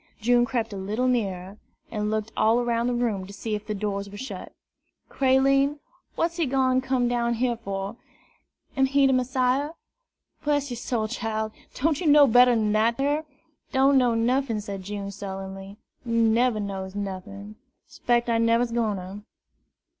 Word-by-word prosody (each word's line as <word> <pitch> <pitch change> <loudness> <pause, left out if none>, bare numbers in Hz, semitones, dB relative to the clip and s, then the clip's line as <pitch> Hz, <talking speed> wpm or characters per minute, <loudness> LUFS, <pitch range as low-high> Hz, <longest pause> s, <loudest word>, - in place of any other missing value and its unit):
June 240 +2 +3
crept 230 -3 -2
a - - -5
little 210 +6 -1
nearer, 195 -5 -2 0.3
and 210 -1 -2
looked 215 0 -2
all 225 +2 +3
around 235 -1 0
the 245 - 0
room 215 -6 -1
to - - -10
see 220 +2 -4
if 210 0 -4
the 215 - -2
doors 200 -1 -3
were 205 - -10
shut. 265 +5 -7 0.6
"Creline, 275 +2 +3 0.4
what's 335 +1 -1
he 330 -4 +1
done 260 -1 +2
gone - - -3
come 260 -2 0
down 235 -1 0
here 240 +1 0
fur? 200 -1 -5 0.8
Am 270 -1 +3
he 275 +1 +3
de 265 - +4
Messiah?" 255 +3 +1 0.7
"Bress 290 -2 0
yer - - -3
soul, 230 -2 -2
chile! 220 -2 -3 0.2
don' 315 +5 +2
ye 335 - -2
know 295 -1 +8
better'n 240 -3 +4
dat 225 +3 +2
ar?" 290 +3 0 0.5
"Don' 270 +1 +4
know 245 -2 +2
nuffin," 240 0 +1
said 200 -2 -6
June 200 +1 -5
sullenly. 195 0 -7 0.3
"Neber 230 0 +2
knows 195 -1 -5
nuffin; 200 +1 -6 0.3
'spects 240 0 0
I 230 -1 +2
neber's 230 +1 +2
gwine 230 -3 0
to. 190 +2 -8
230 Hz, 165 wpm, -25 LUFS, 205-255 Hz, 0.8 s, know